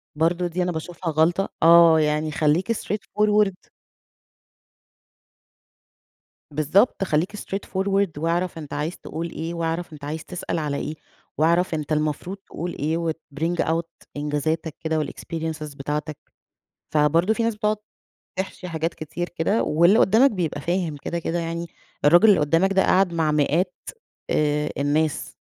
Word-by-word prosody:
برضه 170 +3 +1
دي 180 +1 -1
أنا 180 - -1
باشوفها 165 +1 -4
غلطة، 170 +5 +2
آه 165 -1 +8
يعني 150 0 +1
خلّيك 160 +8 +1
straight 210 -1 -3 0.2
forward. 210 -3 +2 2.8
بالضبط، 155 - +2
خلّيك 175 +4 0
straight 200 -1 -5
forward 195 +1 +1
واعرف 170 +2 -1
أنت 150 -3 -9
عايز 155 +5 -3
تقول 165 +1 -5
إيه، 165 +1 -5
واعرف 165 0 -3
أنت 150 -1 -10
عايز 155 +2 -5
تسأل 180 -1 -4
على 150 -3 -2
إيه، 150 +2 -4 0.4
واعرف 170 +2 +2
أنت 155 0 -3
المفروض 155 +5 -1
تقول 175 -3 -6
إيه 155 +3 0
وتbring 165 0 -3
out 165 +1 0 0.3
إنجازاتك 150 +2 -2
كده 160 0 0
والexperiences 155 -1 -5
بتاعتك، 150 +2 -4 0.8
فبرضه 165 +7 +3
في 230 +1 -1
ناس 230 -1 0
بتقعد 210 0 0 0.6
تحشي 190 -1 -4
حاجات 165 0 -2
كتير 175 +3 -5
كده 175 +6 0
واللي 170 +8 +4
قدّامك 230 +8 +5
بيبقى 170 - -2
فاهم 175 -2 -1
كده، 170 +4 -4
كده 170 +1 -2
يعني، 170 0 -3 0.4
الراجل 175 +8 +7
اللي 200 -7 +6
قدّامك 165 +6 +2
ده 190 0 +4
قاعد 185 -2 +3
مع 160 -2 +1
مئات، 165 +5 +1 0.6
آآ 150 0 +1
الناس، 150 +2 0
165 Hz, 140 wpm, -23 LUFS, 155-180 Hz, 2.8 s, آه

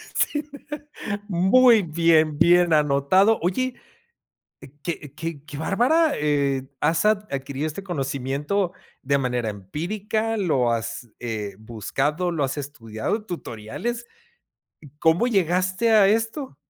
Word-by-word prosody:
Sí. 295 0 0 0.8
Muy 215 +5 +5
bien, 160 -2 +3
bien 175 0 +5
anotado. 150 +9 +4
Oye. 250 +9 -1 1.1
Qué 150 -3 -5
qué 155 -2 -6
qué 150 -2 -8
bárbara, 270 - +2
eh, 140 -3 0
has 160 +5 +2
ad 210 -1 +2
adquirido 140 +2 -3
este 175 +6 -6
conocimiento 145 +3 -2 0.3
de 140 +1 +2
manera 125 -3 -1
empírica, 205 - -3
lo 135 - +1
has, 115 +1 -3
eh, 105 -5 -4
buscado, 135 - -2
lo 155 -4 -1
has 135 +2 -2
estudiado, 140 - -4
tutoriales. 185 - -5 0.7
¿C 145 - -14
cómo 165 +7 +3
llegaste 185 0 +1
a 215 -3 +6
esto? 225 - -1
160 Hz, 115 wpm, -24 LUFS, 135-205 Hz, 1.1 s, a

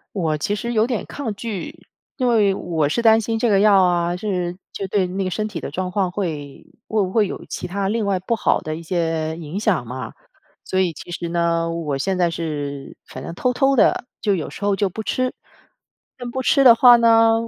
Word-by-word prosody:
我 160 -5 0
其 205 +7 -1
实 235 +3 -3
有 225 0 +3
点 240 -4 -2
抗 230 -8 -5
拒， 225 - -7 0.3
因 255 -3 0
为 210 -4 +3
我 160 -6 -1
是 235 +10 -1
担 225 -1 +6
心 225 +1 -2
这 235 - +1
个 195 -1 +4
药 200 -2 +6
啊， 175 -1 +1
是 180 -3 -2 0.2
就 195 - -4
对 190 -1 +1
那 190 +2 -3
个 185 - -2
身 215 +3 -2
体 185 -7 -6
的 - - -6
状 185 +4 -3
况 185 -2 0
会 155 -8 -5 0.2
会 215 -2 +1
不 185 0 -3
会 215 -3 +3
有 - - -7
其 - - -5
它 195 +2 -2
另 220 -1 -1
外 195 -2 +1
不 190 +6 -1
好 - - +1
的 155 0 -4
一 165 - -7
些 165 -2 -1
影 170 +4 -5
响 185 - +1
嘛。 130 +2 -6 0.5
所 185 - 0
以 180 -3 +1
其 175 - -11
实 170 0 -4
呢， 170 -1 0
我 160 -4 -3
现 190 +6 -1
在 175 -1 +2
是 145 -4 -5
反 130 - -9
正 165 - -7
偷 250 +7 0
偷 270 +1 +2
地 245 - +3
就 205 -3 +1
有 160 - -3
时 200 - -7
候 205 -1 +2
就 200 -1 +1
不 220 +5 -6
吃。 255 +3 -1 0.8
但 245 - -6
不 260 - -2
吃 275 +2 +3
的 235 -2 +9
话 245 0 +8
呢， 225 -1 +5
190 Hz, 245 characters per minute, -21 LUFS, 170-220 Hz, 0.8 s, 的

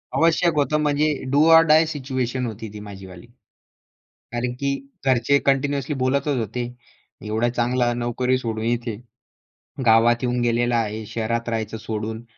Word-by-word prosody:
आवश्यक 165 +1 +3
होतं, 150 +1 +1
म्हणजे 150 +1 +2 0.2
डू 145 +2 +4
ऑर 165 0 +9
डाय 155 +2 +6
सिच्युएशन 130 -4 -3
होती 110 -1 -6
ती 105 - -8
माझी 100 -2 -10
वाली. 90 +4 -13 1.1
कारण 120 +1 -2
की 140 0 0 0.3
घरचे 130 +1 +3
कंटिन्यूअसली 140 +1 +1
बोलतच 135 +2 0
होते, 120 +2 -3 0.6
"एवढा 110 +3 0
चांगला 120 0 0
नोकरी 120 +2 0
सोडून 115 -3 -4
इथे, 120 -1 -1 0.9
गावात 115 +1 +5
येऊन 125 -1 0
गेलेला 120 0 +1
आहे, 110 0 -4
शहरात 115 +2 -2
राहायचं 110 -1 -3
सोडून, 110 +1 -5
120 Hz, 140 wpm, -22 LUFS, 115-140 Hz, 1.1 s, ऑर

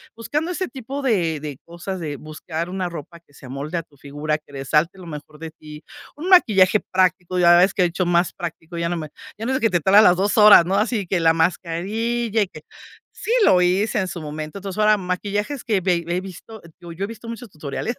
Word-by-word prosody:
buscando 300 +9 -3
ese 370 +1 -3
tipo 270 +1 -6
de 180 - 0
de 145 -3 -6
cosas, 175 +3 -6
de 155 -4 -4
buscar 160 +3 -6
una 185 -1 -3
ropa 170 +1 -9
que 165 -4 -30
se 135 - -15
amolde 140 +6 -5
a - - -7
tu 145 -2 -26
figura, 145 +2 -3
que 150 - -23
resalte 150 +7 0
lo 180 - -11
mejor 150 -1 -10
de 165 0 -6
ti. 150 -1 -13 0.3
Un 330 +5 -5
maquillaje 210 - +5
práctico, 185 -1 0
ya 175 -1 +6
ves 185 +2 +4
que - - 0
de 175 - +4
hecho 180 +2 -2
más 175 0 +2
práctico 170 -1 -7
ya 170 0 -1
no 175 - -2
me 155 -2 -6 0.3
ya 225 - -6
no - - 0
es - - +2
de - - -16
que 225 - +2
te 175 - +2
tardas 200 +6 +6
las 180 - +6
2 200 +4 0
horas, 210 -4 +9
¿no? 190 +3 0
Así 210 -1 0
que 180 0 0
la 165 -1 +4
mascarilla, 205 +8 -1
y - - -5
que 155 - -12 0.5
sí - - -6
lo 180 - +5
hice 195 +6 +1
en 190 - -1
su 175 -2 -6
momento. 155 +4 -6
Entonces, 195 +1 -6
ahora 215 0 +5
maquillajes 205 +7 -3
que 210 -5 +1
ve 175 -2 +1
ve 175 +1 -2
he - - -2
visto, 195 +3 -11 0.2
digo, 170 -1 -10
yo 180 +4 -5
he - - -7
visto 230 +1 -10
muchos 230 0 -8
tutoriales 155 - -5
180 Hz, 240 wpm, -21 LUFS, 165-210 Hz, 0.5 s, horas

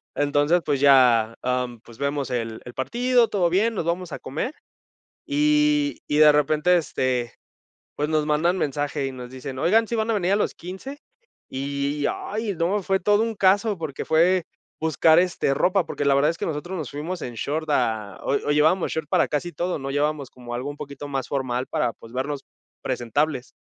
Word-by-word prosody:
Entonces, 145 +4 +2
pues 145 -3 0
ya, 125 -5 +5
em, 125 -2 -2
pues 115 -1 -15
vemos 140 -1 -2
el 115 -3 -3
el 120 - -10
partido, 240 - +2
todo 180 -4 +1
bien, 215 +6 +2
nos 170 - -3
vamos 170 0 -2
a - - -5
comer, 250 - -4 0.7
y 300 0 +2
y 150 - 0
de 155 -1 +8
repente, 155 +4 +3
este, 130 -7 -1 0.6
pues, 150 +2 -1
nos 155 -1 +1
mandan 170 +5 +2
mensaje, 145 -1 -1
y 135 - -4
nos 125 -1 -9
dicen: 130 0 -7
"Oigan, 220 +9 +3
¿sí 235 - -2
van 220 0 0
a - - +2
venir 190 -1 +1
a - - +4
los 210 - 0
15?". 190 +11 -8 0.5
Y 140 +2 -2
ay, 210 -1 -4
no, 190 +5 0
fue 190 +1 0
todo 205 +3 +3
un 225 -1 -1
caso, 200 +1 +2
porque 155 -5 -5
fue 175 +2 +3 0.4
buscar, 160 +1 +4
este, 175 -6 +1
ropa, 185 +5 +2
porque, 145 - -3
la 140 -1 +4
verdad 145 +3 +3
es 165 - -5
que - - -3
nosotros 170 +4 -4
nos 155 -6 -5
fuimos 160 +5 -5
en 120 - -5
short 155 +7 -3
a 110 -7 0
o - - -1
o, 145 - -1
llevábamos 155 +5 +3
short 160 -2 -3
para - - +3
casi 170 +4 -2
todo, 175 -1 -2
no 135 0 -5
llevábamos 145 -1 -1
como 120 -1 -10
algo 130 +4 -3
un 145 - -6
poquito 140 0 -8
más 135 -2 -3
formal 130 -2 -2
para, 115 - -1
pues, 115 +1 -14
vernos 135 +2 -3 0.4
presentables. 130 +2 -1
150 Hz, 195 wpm, -24 LUFS, 135-180 Hz, 0.7 s, de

